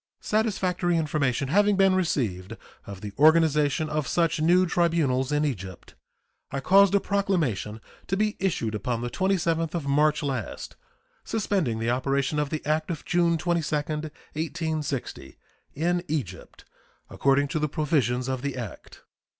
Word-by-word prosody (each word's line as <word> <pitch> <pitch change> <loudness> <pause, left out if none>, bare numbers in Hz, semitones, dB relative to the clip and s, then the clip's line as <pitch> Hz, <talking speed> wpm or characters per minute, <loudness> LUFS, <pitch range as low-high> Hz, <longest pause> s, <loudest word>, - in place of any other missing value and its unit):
Satisfactory 185 -5 0
information 140 -4 0
having 205 +5 +3
been 195 -1 +4
received 115 - -1 0.3
of 100 -1 -8
the 105 -1 -7
organization 155 -1 +4
of 150 -2 -2
such 165 -3 +1
new 180 +3 +4
tribunals 160 -7 +1
in 150 +1 +1
Egypt, 95 - -6 0.6
I 140 - -3
caused 195 +6 +5
a - - +5
proclamation 165 - -1 0.3
to 195 - -1
be 215 +1 0
issued 165 - -1
upon 115 +2 -2
the 120 0 -4
27th 170 -2 0
of 165 -4 -3
March 150 +2 +2
last, 130 -6 -4 0.5
suspending 195 - -1
the 115 +1 0
operation 135 +3 0
of 150 -1 -1
the 155 - -4
act 155 +2 0
of 165 -3 -5
June 170 -1 +2
22, 170 -2 0
1860, 155 - -4 0.4
in 175 +4 0
Egypt, 115 - -5 0.5
according 140 +1 +2
to 155 - -1
the 150 0 0
provisions 135 -5 0
of 130 -1 -2
the 140 -1 -3
act. 115 -7 -9
155 Hz, 140 wpm, -26 LUFS, 130-175 Hz, 0.6 s, caused